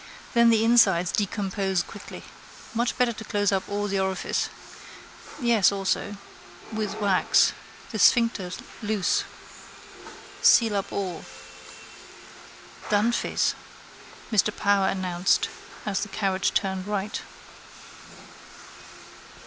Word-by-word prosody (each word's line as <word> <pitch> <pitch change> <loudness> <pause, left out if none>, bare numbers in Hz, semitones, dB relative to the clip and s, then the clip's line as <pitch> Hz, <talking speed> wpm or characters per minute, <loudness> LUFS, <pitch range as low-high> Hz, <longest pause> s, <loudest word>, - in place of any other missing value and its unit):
Then 235 -1 +5
the 225 -1 +3
insides 195 -7 +4
decompose 195 -2 -1
quickly. - - -10 0.5
Much 235 +1 -1
better 245 -2 +2
to 220 - -9
close 205 -2 0
up 190 -1 -1
all 205 0 -2
the 195 -1 -1
orifices. 190 -1 -1 0.9
Yes, 235 -7 +4
also. 200 +1 -2 0.6
With 215 -2 -3
wax. 200 -3 +3 0.4
The - - -4
sphincter 230 -6 +3 0.3
loose. 210 -4 0 1.2
Seal 225 -3 +5
up 195 - -4
all. 185 -4 -4 1.7
—Dunphy's, 215 +3 +1 0.8
Mr 210 -1 +3
Power 200 -1 +1
announced 185 -1 +1 0.4
as 200 -2 -1
the 210 - -4
carriage 190 -1 0
turned 190 -1 -1
right. 205 0 -3
205 Hz, 100 wpm, -25 LUFS, 190-220 Hz, 1.7 s, Then